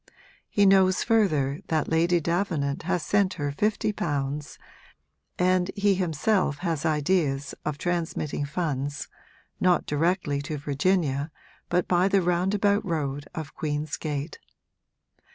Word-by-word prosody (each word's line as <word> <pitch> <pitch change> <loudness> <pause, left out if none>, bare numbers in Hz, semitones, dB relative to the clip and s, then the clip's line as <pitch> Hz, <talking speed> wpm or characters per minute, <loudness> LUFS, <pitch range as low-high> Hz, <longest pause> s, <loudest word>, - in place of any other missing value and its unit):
He 205 - +3
knows 190 -1 +5
further 155 - +2
that 160 -2 0
Lady 170 +2 +2
Davenant 165 -4 -1
has 180 -3 +1
sent 200 -2 +2
her 145 -4 -2
fifty 210 +6 0
pounds, 145 -4 -3 0.8
and 180 0 +2
he 200 -1 +3
himself 180 -2 +1
has 165 -2 0
ideas 150 -3 0
of 150 -2 -2
transmitting 165 -4 -2
funds, 145 -3 -3 0.5
not 180 -1 +3
directly 150 -1 0
to 150 +1 -4
Virginia 145 0 0 0.4
but 175 0 +1
by 180 +1 +3
the 195 -1 +2
roundabout 200 +4 +2
road 145 -6 -3
of 155 -2 -6
Queen's 150 0 -2
Gate. 150 0 -4
165 Hz, 120 wpm, -26 LUFS, 145-185 Hz, 0.8 s, knows